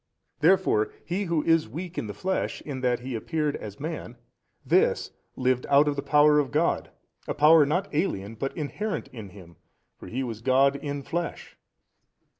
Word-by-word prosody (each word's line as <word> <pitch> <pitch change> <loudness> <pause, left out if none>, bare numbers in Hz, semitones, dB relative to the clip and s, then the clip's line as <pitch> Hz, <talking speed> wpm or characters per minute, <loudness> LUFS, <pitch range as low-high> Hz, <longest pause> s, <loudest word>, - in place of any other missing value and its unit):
A. - - -49
Therefore 165 - +3
He 190 +4 -2
Who 165 -4 0
is 165 -7 +2
weak 170 +7 -7
in - - -3
the 105 - -7
flesh 190 - -2
in 135 -3 -6
that 125 -1 +1
He 130 +1 -5
appeared 150 +5 -1
as 105 -2 -9
man, 150 -6 -6 0.5
This - - +2 0.2
lived 130 -1 0
out 140 +2 +5
of 145 - +1
the 140 - -2
power 150 +1 +5
of 140 -3 0
God, 155 +3 0 0.4
a - - -2
power 150 0 +6
not 180 +7 0
alien 115 - -1
but 135 +5 -5
inherent 200 +8 -3
in 110 -5 -9
Him, 90 -4 -15 0.4
for - - -10
He 130 +3 -3
was 115 -3 -5
God 135 +3 +3
in 140 -1 -5
flesh. 170 +3 -4
145 Hz, 180 wpm, -26 LUFS, 125-160 Hz, 0.5 s, power